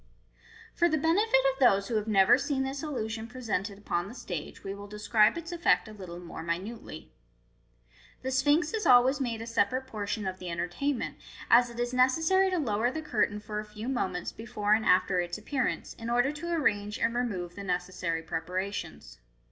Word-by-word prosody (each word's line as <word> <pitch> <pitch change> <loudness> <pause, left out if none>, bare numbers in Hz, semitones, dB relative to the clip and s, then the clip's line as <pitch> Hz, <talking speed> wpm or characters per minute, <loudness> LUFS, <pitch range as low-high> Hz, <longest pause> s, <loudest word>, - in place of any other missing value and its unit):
For 345 - +3
the 315 - +2
benefit 330 +2 +3
of 265 - -17
those 200 -7 +4
who - - -4
have 210 0 -2
never 195 -3 +6
seen 265 +1 -1
this 270 +1 -4
illusion 225 -7 -4
pre 250 +2 -10
sented 205 -3 -2
upon 175 -3 -2
the 230 - -10
stage, 175 -10 -6
we 195 - -4
will 200 0 -9
describe 210 +3 +3
its 335 +1 -6
effect 345 -8 +2
a 215 - -10
little 180 -4 -8
more 175 -2 -8
minutely. 170 +2 -5 1.1
The 260 - -2
Sphinx 290 +6 +2
is 440 -1 -1
always 255 +3 +6
made 230 -3 -2
a - - -7
separate 230 +3 0
portion 210 -3 -4
of 185 0 -4
the 180 - -6
entertainment, 175 +11 -2 0.3
as 245 +1 +7
it 235 0 -9
is 240 +1 -1
necessary 320 +10 +3
to 370 - 0
lower 235 -5 +1
the 315 +4 -5
curtain 210 -6 0
for 210 0 -5
a - - -4
few 210 +2 -8
moments 190 -9 -2
before 210 -2 -1
and 220 0 +2
after 185 0 +4
its 175 0 -2
appearance, 255 +4 -2
in 230 0 -5
order 245 +3 +2
to 325 +3 -5
arrange 210 -10 0
and 230 - +1
remove 200 -8 -2
the 200 - -8
necessary 180 -3 -2
preparations. 180 - -5
220 Hz, 190 wpm, -29 LUFS, 195-265 Hz, 1.1 s, as